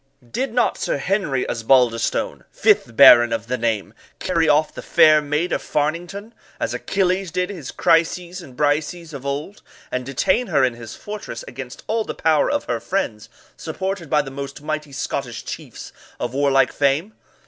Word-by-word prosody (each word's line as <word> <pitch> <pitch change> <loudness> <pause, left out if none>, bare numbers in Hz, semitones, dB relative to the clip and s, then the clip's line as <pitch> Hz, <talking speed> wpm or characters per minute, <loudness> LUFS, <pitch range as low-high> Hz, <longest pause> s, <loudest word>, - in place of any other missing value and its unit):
Did 265 - -2
not 245 +1 +1
Sir - - -1
Henry 145 -5 -1
Osbaldistone, 115 0 +1
fifth 115 - +2
baron 120 -3 +8
of 115 -1 -2
the 125 +2 -2
name, 115 -4 -2 0.2
carry 165 -3 +1
off 150 +1 +3
the - - -7
fair 155 -1 +5
maid 150 +4 -1
of - - 0
Fairnington, 175 +9 -3 0.3
as - - -2
Achilles 190 -1 0
did 180 +4 -2
his 165 -10 -7
Chryseis 175 +2 +1
and 130 -7 -14
Briseis 155 +3 -1
of 140 -1 -7
old, 150 +9 -4 0.3
and 125 - -2
detain 185 - 0
her - - +2
in 125 -2 +2
his 115 -1 -9
fortress 210 - -7
against - - -9
all 225 0 0
the - - -6
power 155 -2 +2
of - - 0
her 120 -1 -2
friends, 115 - -3 0.3
supported 190 -4 -4
by 150 -1 +3
the 135 - -8
most 140 +1 -7
mighty 150 -1 -4
Scottish 135 -2 -4
chiefs - - -8 0.3
of 120 0 -3
warlike 135 -1 +3
fame? 145 +9 +1
150 Hz, 170 wpm, -21 LUFS, 130-180 Hz, 0.3 s, baron